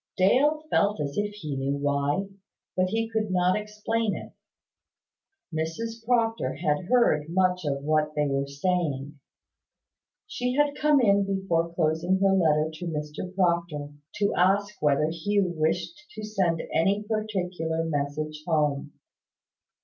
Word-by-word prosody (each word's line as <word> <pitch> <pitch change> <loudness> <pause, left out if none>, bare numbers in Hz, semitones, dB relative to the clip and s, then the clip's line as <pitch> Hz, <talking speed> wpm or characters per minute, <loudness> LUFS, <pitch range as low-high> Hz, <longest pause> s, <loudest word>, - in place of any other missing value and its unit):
Dale 285 +11 +3
felt 205 -2 +2
as 140 -1 -3
if 205 0 -1
he 155 -8 -5
knew 135 +1 -1
why; 145 +6 0 0.5
but 185 0 +2
he 225 +2 0
could 220 -2 -1
not 180 0 +2
explain 210 +1 -1
it. - - -9 1.2
Mrs 225 +9 -3
Proctor 230 -1 +1
had 155 0 0
heard 175 -10 +3
much 180 0 +1
of 140 -1 -2
what 150 0 +1
they 150 0 +2
were 140 0 -1
saying. 145 -2 -2 1.1
She 250 -11 -2
had 290 0 +3
come 300 -2 +4
in 200 -3 +4
before 190 -4 0
closing 165 +3 +1
her 195 0 +4
letter 155 -4 +3
to 170 +3 -6
Mr 150 +3 -4
Proctor, 170 -5 0 0.3
to 205 -1 +1
ask 200 +3 +2
whether 150 0 +3
Hugh 185 +2 0
wished 165 - -1
to 215 - -6
send 190 -6 0
any 195 +6 +2
particular 185 -7 -2
message 155 0 -3
home. 150 -4 0
180 Hz, 135 wpm, -26 LUFS, 155-210 Hz, 1.2 s, come